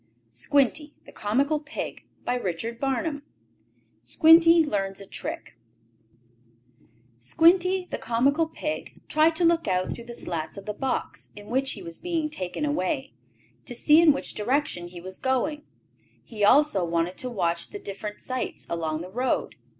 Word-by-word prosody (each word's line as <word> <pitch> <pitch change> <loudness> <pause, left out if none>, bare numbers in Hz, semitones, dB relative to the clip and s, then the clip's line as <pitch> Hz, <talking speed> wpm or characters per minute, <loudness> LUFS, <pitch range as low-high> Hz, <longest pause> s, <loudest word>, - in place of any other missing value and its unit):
Squinty 285 - +1
had - - -15
started 260 +8 0
on 305 -1 +1
his 245 - -4
journey. 230 +1 -4
CHAPTER 265 0 -1
VII 295 -3 -3 0.8
SQUINTY 325 - +6
LEARNS 195 -7 -2
A 200 - -9
TRICK - - -6 1.7
Squinty, 360 - +3
the - - -3
comical 280 +7 +2
pig, 305 -1 -5
tried 315 +1 +3
to 345 - +2
look 335 0 +3
out 185 -1 0
through 235 - -10
the 235 0 -8
slats 165 -2 -4
of 195 - -8
the 210 - -3
box, 265 +5 -3
in 210 +1 -11
which 265 +2 +1
he 195 - -9
was 170 -1 -8
being 330 -3 -2
taken 190 +3 -3
away, 275 -1 -1 0.5
to 245 - -6
see 300 +6 +5
in 330 -2 +7
which 275 - -3
direction 230 -6 -1
he 175 0 -10
was 185 +2 -7
going. 280 +4 -1 0.6
He 215 -3 -5
also 235 -3 +5
wanted 170 +1 -1
to 255 - -3
watch 170 -7 -1
the - - -7
different 210 - -7
sights 255 0 -4
along 160 -2 -2
the 180 +1 -8
road. 250 +5 -1
250 Hz, 160 wpm, -26 LUFS, 190-300 Hz, 1.7 s, in